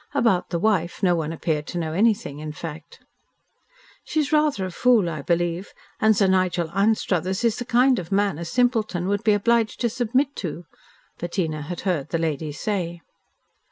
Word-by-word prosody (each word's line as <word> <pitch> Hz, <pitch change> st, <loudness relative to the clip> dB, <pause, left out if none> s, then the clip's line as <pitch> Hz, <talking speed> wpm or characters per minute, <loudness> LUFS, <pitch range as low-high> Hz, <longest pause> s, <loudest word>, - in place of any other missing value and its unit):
About 230 Hz, -9 st, +2 dB
the 170 Hz, -, -1 dB
wife 185 Hz, -1 st, 0 dB
no 180 Hz, -2 st, +4 dB
one 160 Hz, -2 st, -1 dB
appeared 155 Hz, -2 st, -2 dB
to 180 Hz, -, -5 dB
know 160 Hz, -2 st, -2 dB
anything, 205 Hz, -6 st, +1 dB
in 155 Hz, 0 st, -6 dB
fact. 160 Hz, 0 st, -9 dB, 1.0 s
"She 315 Hz, -, -2 dB
is 295 Hz, -2 st, 0 dB
rather 300 Hz, -10 st, +2 dB
a 185 Hz, -, -5 dB
fool, 230 Hz, -1 st, +3 dB
I 155 Hz, -3 st, -5 dB
believe, 175 Hz, +3 st, -1 dB, 0.3 s
and 220 Hz, -1 st, +4 dB
Sir 200 Hz, -, +4 dB
Nigel 185 Hz, -3 st, +1 dB
Anstruthers 190 Hz, -1 st, +1 dB
is 230 Hz, -1 st, +2 dB
the 245 Hz, -, -4 dB
kind 250 Hz, +1 st, +3 dB
of 170 Hz, 0 st, -8 dB
man 200 Hz, -5 st, +1 dB
a 170 Hz, -, -4 dB
simpleton 220 Hz, -4 st, 0 dB
would 205 Hz, +2 st, 0 dB
be 215 Hz, -, +4 dB
obliged 225 Hz, +1 st, +1 dB
to 240 Hz, -, +2 dB
submit 255 Hz, +4 st, 0 dB
to," 175 Hz, -1 st, -5 dB, 0.5 s
Bettina 170 Hz, -3 st, -2 dB
had 170 Hz, +4 st, -6 dB
heard 165 Hz, -7 st, -1 dB
the 165 Hz, -, 0 dB
lady 160 Hz, -2 st, -2 dB
say. 175 Hz, +1 st, -3 dB
185 Hz, 180 wpm, -23 LUFS, 165-220 Hz, 1.0 s, no